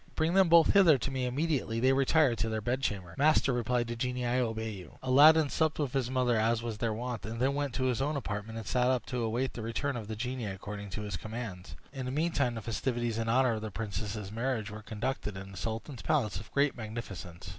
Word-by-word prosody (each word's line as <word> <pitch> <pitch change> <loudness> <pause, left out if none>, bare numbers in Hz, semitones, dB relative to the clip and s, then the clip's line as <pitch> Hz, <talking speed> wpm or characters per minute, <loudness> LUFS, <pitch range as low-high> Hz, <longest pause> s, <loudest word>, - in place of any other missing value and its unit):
Bring 160 +2 +1
them 190 -2 +5
both 165 -1 +6
hither 180 -8 +7
to 135 - -3
me 130 -1 -1
immediately 135 -4 -1
they 130 +2 +4
retire 135 -1 +3
to 115 +1 -1
their 110 0 -1
bedchamber." 105 -7 -2
"Master," 145 -2 +4
replied 120 0 0
the 120 0 -4
genie, 125 +1 -2
"I 120 +1 +1
obey 110 -2 -1
you." 95 -3 -10
Aladdin 145 +4 +6
supped 160 -1 +1
with 145 -5 -2
his 130 -3 0
mother 125 -3 +2
as 115 +1 +1
was 115 -3 -4
their 115 - 0
wont, 120 +1 -4
and 115 +2 -5
then 135 +3 +2
went 140 -3 -2
to 130 - -1
his 130 -1 +1
own 150 +3 0
apartment, 105 -2 -4
and 110 - -6
sat 125 +3 +1
up 125 -3 +1
to 125 -2 -3
await 120 +4 -1
the 120 - -6
return 120 +5 -2
of 110 -4 -5
the 110 - -4
genie, 125 +2 -3
according 100 +1 -6
to 105 - -4
his 105 -4 -3
commands. 105 -1 -7 0.2
In 130 -2 -4
the - - -2
meantime, 140 -4 0
the 115 - -6
festivities 120 0 -1
in 115 0 -1
honor 125 0 +3
of 110 - -3
the 110 - -4
princess's 105 0 -4
marriage 115 -2 -2
were 110 +1 -8
conducted 105 -1 -3
in 95 0 -8
the 95 - -10
sultan's 115 - -4
palace 115 - 0
with 110 - -12
great 140 0 +2
magnificence. 100 -6 -7
120 Hz, 235 wpm, -31 LUFS, 110-135 Hz, 0.2 s, hither